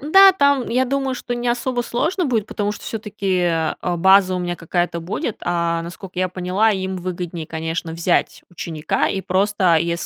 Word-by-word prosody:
Да, 385 Hz, +7 st, +7 dB
там, 280 Hz, -7 st, +2 dB
я 255 Hz, +2 st, +2 dB
думаю, 270 Hz, 0 st, -1 dB
что 245 Hz, -, -4 dB
не 240 Hz, 0 st, -2 dB
особо 245 Hz, 0 st, 0 dB
сложно 325 Hz, +10 st, -1 dB
будет, 225 Hz, -6 st, 0 dB
потому 205 Hz, 0 st, -2 dB
что -, -, -10 dB
всё-таки, 205 Hz, -4 st, -2 dB
а, 165 Hz, -2 st, 0 dB, 0.2 s
база 190 Hz, +1 st, +5 dB
у -, -, -1 dB
меня 175 Hz, -1 st, -3 dB
какая-то 175 Hz, +1 st, -1 dB
будет. 205 Hz, -, -3 dB
А, 170 Hz, -1 st, 0 dB
насколько 180 Hz, +2 st, -9 dB
я 185 Hz, -, +1 dB
поняла, 185 Hz, +4 st, +1 dB
им 190 Hz, -1 st, -3 dB
выгоднее, 175 Hz, -2 st, -5 dB
конечно, 160 Hz, +1 st, -4 dB
взять 170 Hz, +2 st, 0 dB
ученика 160 Hz, -3 st, -2 dB
и 195 Hz, -, -2 dB
просто, 190 Hz, -2 st, +2 dB
если 170 Hz, +1 st, -1 dB
185 Hz, 180 wpm, -21 LUFS, 170-240 Hz, 0.2 s, Да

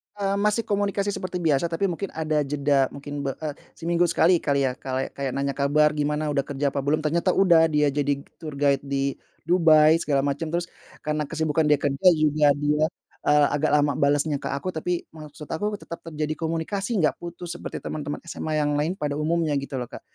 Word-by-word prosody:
Eee, 200 Hz, -1 st, -1 dB
masih 210 Hz, +2 st, +1 dB
komunikasi 200 Hz, 0 st, 0 dB
seperti 185 Hz, -1 st, -4 dB
biasa, 155 Hz, 0 st, +2 dB
tapi 165 Hz, +4 st, -1 dB
mungkin 190 Hz, +3 st, -4 dB
ada 155 Hz, -1 st, 0 dB
jeda, 140 Hz, -1 st, +1 dB
mungkin, 145 Hz, 0 st, -6 dB
be 135 Hz, -, 0 dB
eee, 155 Hz, -2 st, -4 dB, 0.2 s
seminggu 170 Hz, +1 st, +1 dB
sekali, 170 Hz, +1 st, +4 dB
kali, 140 Hz, -1 st, +1 dB
ya, 130 Hz, -, +1 dB
kala 130 Hz, 0 st, -4 dB
kayak 135 Hz, -2 st, -3 dB
nanya 140 Hz, 0 st, -1 dB
kabar, 145 Hz, +2 st, +3 dB
"Gimana, 150 Hz, 0 st, -1 dB
udah 140 Hz, -1 st, +1 dB
kerja 140 Hz, 0 st, -1 dB
apa 140 Hz, -, -1 dB
belum?" 150 Hz, +3 st, 0 dB
Ternyata 170 Hz, +4 st, +1 dB
udah, 170 Hz, -4 st, +5 dB
dia 150 Hz, -2 st, +2 dB
jadi 145 Hz, -1 st, 0 dB, 0.2 s
tour 155 Hz, -3 st, -7 dB
guide 140 Hz, -1 st, +2 dB
di 140 Hz, 0 st, -1 dB, 0.3 s
Dubai, 160 Hz, -2 st, +5 dB
segala 140 Hz, -4 st, +1 dB
macam, 145 Hz, +3 st, -2 dB
terus 175 Hz, +1 st, -1 dB, 0.4 s
karena 150 Hz, 0 st, 0 dB
kesibukan 160 Hz, 0 st, 0 dB
dia 150 Hz, -, +5 dB
kerja 140 Hz, +5 st, +1 dB
juga 150 Hz, -1 st, +3 dB
dia, 150 Hz, +1 st, +1 dB, 0.5 s
eee, 150 Hz, -1 st, +5 dB
agak 150 Hz, +1 st, +1 dB
lama 145 Hz, 0 st, +3 dB
balasnya 145 Hz, 0 st, +1 dB
ke -, -, -4 dB
aku, 140 Hz, +7 st, -3 dB
tapi 175 Hz, +2 st, -2 dB
maksud 150 Hz, -1 st, -10 dB
aku 205 Hz, +7 st, -3 dB
tetap 170 Hz, -4 st, -9 dB
terjadi 155 Hz, -1 st, -3 dB
komunikasi, 170 Hz, +7 st, -2 dB
nggak 160 Hz, -5 st, +2 dB
putus 170 Hz, 0 st, -6 dB
seperti -, -, -6 dB
teman-teman 145 Hz, -1 st, -4 dB
SMA 155 Hz, -2 st, -3 dB
yang 150 Hz, -1 st, +1 dB
lain 155 Hz, +6 st, -1 dB
pada 150 Hz, -4 st, -2 dB
umumnya, 155 Hz, +1 st, 0 dB
gitu, 140 Hz, -1 st, -5 dB
loh, 125 Hz, -, -3 dB
Kak. -, -, -9 dB
150 Hz, 195 wpm, -24 LUFS, 145-170 Hz, 0.5 s, udah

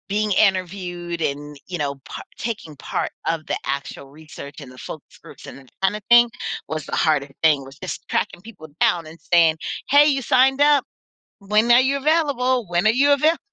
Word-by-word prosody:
Being 210 Hz, +1 st, 0 dB
interviewed 180 Hz, -3 st, -1 dB
and 145 Hz, 0 st, -3 dB
you 180 Hz, -, -4 dB
know 140 Hz, -3 st, -2 dB
par -, -, -8 dB
taking 210 Hz, -10 st, -5 dB
part -, -, -4 dB
of 165 Hz, -2 st, -2 dB
the -, -, -1 dB
actual 140 Hz, 0 st, -5 dB
research 145 Hz, -1 st, -12 dB
and 135 Hz, -4 st, -11 dB
the 130 Hz, -, -15 dB
focus -, -, -10 dB
groups -, -, -14 dB
and -, -, -10 dB
that 130 Hz, -2 st, -20 dB
kinda 200 Hz, +2 st, 0 dB
thing 240 Hz, 0 st, +7 dB, 0.4 s
was 155 Hz, -1 st, -4 dB
the -, -, -4 dB
hardest 150 Hz, -3 st, +1 dB
thing 150 Hz, -4 st, +4 dB
was 135 Hz, +1 st, -13 dB
just -, -, -7 dB
tracking -, -, -2 dB
people 195 Hz, -7 st, -12 dB
down 170 Hz, -2 st, +2 dB
and 160 Hz, +2 st, -13 dB
saying, 165 Hz, -2 st, +3 dB, 0.3 s
"Hey, 290 Hz, +2 st, +6 dB
you 275 Hz, -2 st, +1 dB
signed 265 Hz, +2 st, +3 dB
up, 290 Hz, -2 st, +4 dB, 0.5 s
when 210 Hz, +3 st, +2 dB
are 240 Hz, +1 st, +7 dB
you 270 Hz, +2 st, +1 dB
available? 275 Hz, -, +1 dB
When 175 Hz, +4 st, +1 dB
are -, -, +6 dB
you 280 Hz, +5 st, +3 dB
available?" 310 Hz, +4 st, +2 dB
185 Hz, 190 wpm, -21 LUFS, 155-250 Hz, 0.5 s, thing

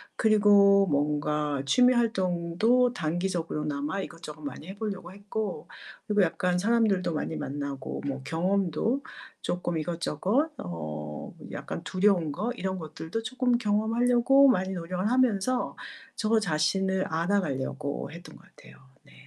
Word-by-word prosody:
그리고 205 Hz, -2 st, +5 dB
뭔가 150 Hz, -1 st, 0 dB
취미 250 Hz, -, +5 dB
활동도 220 Hz, +3 st, +2 dB
단기적으로나마 160 Hz, -2 st, -2 dB
이것저것 155 Hz, -4 st, -9 dB
많이 145 Hz, +3 st, -7 dB
해 195 Hz, +1 st, -8 dB
보려고 195 Hz, -5 st, -5 dB
했고 205 Hz, +2 st, -4 dB, 0.4 s
그리고 210 Hz, -1 st, +3 dB
약간 180 Hz, +1 st, 0 dB
사람들도 205 Hz, -5 st, +2 dB
많이 160 Hz, -, -3 dB
만나고 140 Hz, -1 st, -4 dB
뭐 135 Hz, -1 st, -3 dB
경험도 185 Hz, -, 0 dB, 0.4 s
쪼끔 175 Hz, -1 st, -2 dB
이것저것 180 Hz, -, 0 dB
어 75 Hz, -3 st, -6 dB, 0.2 s
약간 170 Hz, -, -6 dB
두려운 185 Hz, -5 st, +2 dB
거, 210 Hz, +10 st, -2 dB
이런 190 Hz, 0 st, -3 dB
것들도 160 Hz, +7 st, -5 dB
쪼끔 250 Hz, 0 st, +1 dB
경험하려고 240 Hz, +5 st, +4 dB
많이 190 Hz, -7 st, +2 dB
노력을 180 Hz, +4 st, -2 dB
하면서 250 Hz, -1 st, +1 dB, 0.4 s
저 220 Hz, 0 st, +2 dB
자신을 190 Hz, +2 st, +1 dB
알아가려고 160 Hz, -6 st, -1 dB
했던 170 Hz, +2 st, -11 dB
것 -, -, -20 dB
같아요. -, -, -16 dB, 0.3 s
네. -, -, -20 dB
185 Hz, 300 characters per minute, -28 LUFS, 155-215 Hz, 0.4 s, 그리고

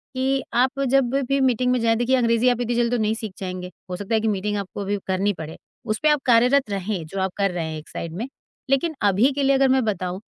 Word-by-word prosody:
कि 265 Hz, +1 st, 0 dB
आप 260 Hz, +3 st, +1 dB
जब 265 Hz, -2 st, +3 dB, 0.2 s
भी 275 Hz, 0 st, +2 dB
मीटिंग 250 Hz, -1 st, +2 dB
में 250 Hz, -, +1 dB
जाएँ 225 Hz, 0 st, +3 dB
देखिए, 245 Hz, +2 st, +2 dB
अंग्रेज़ी 235 Hz, 0 st, +3 dB
आप 245 Hz, 0 st, 0 dB
इतनी 240 Hz, 0 st, -1 dB
जल्दी 240 Hz, 0 st, +1 dB
तो -, -, -1 dB
नहीं 215 Hz, +1 st, +1 dB
सीख 220 Hz, -3 st, -6 dB
जाएँगे। 185 Hz, -1 st, -5 dB, 0.2 s
हो -, -, -2 dB
सकता 205 Hz, +3 st, -2 dB
है 220 Hz, -, +2 dB
कि 225 Hz, -, -1 dB
मीटिंग 210 Hz, 0 st, -1 dB
आपको 200 Hz, 0 st, -5 dB
अभी 200 Hz, +1 st, -1 dB
करनी 195 Hz, +2 st, +1 dB
पड़े। 160 Hz, -2 st, -8 dB, 0.3 s
उस 215 Hz, 0 st, -2 dB
पे 305 Hz, -, +5 dB
आप 295 Hz, -2 st, +2 dB
कार्यरत 250 Hz, +2 st, +4 dB
रहें, 195 Hz, -3 st, -3 dB
जो 195 Hz, +5 st, -5 dB
आप 190 Hz, -, 0 dB
कर 195 Hz, -1 st, +1 dB
रहे 175 Hz, -2 st, -3 dB
हैं 160 Hz, 0 st, -5 dB
एक 150 Hz, -, -15 dB
साइड 165 Hz, -1 st, -6 dB
में। 230 Hz, +5 st, -3 dB, 0.4 s
लेकिन 290 Hz, +4 st, +1 dB
अभी 205 Hz, +6 st, +3 dB
के 285 Hz, +1 st, -1 dB
लिए 275 Hz, 0 st, +4 dB
अगर 270 Hz, 0 st, +3 dB
मैं 260 Hz, 0 st, +3 dB
बताऊँ 185 Hz, -2 st, -2 dB
225 Hz, 260 wpm, -23 LUFS, 195-255 Hz, 0.4 s, पे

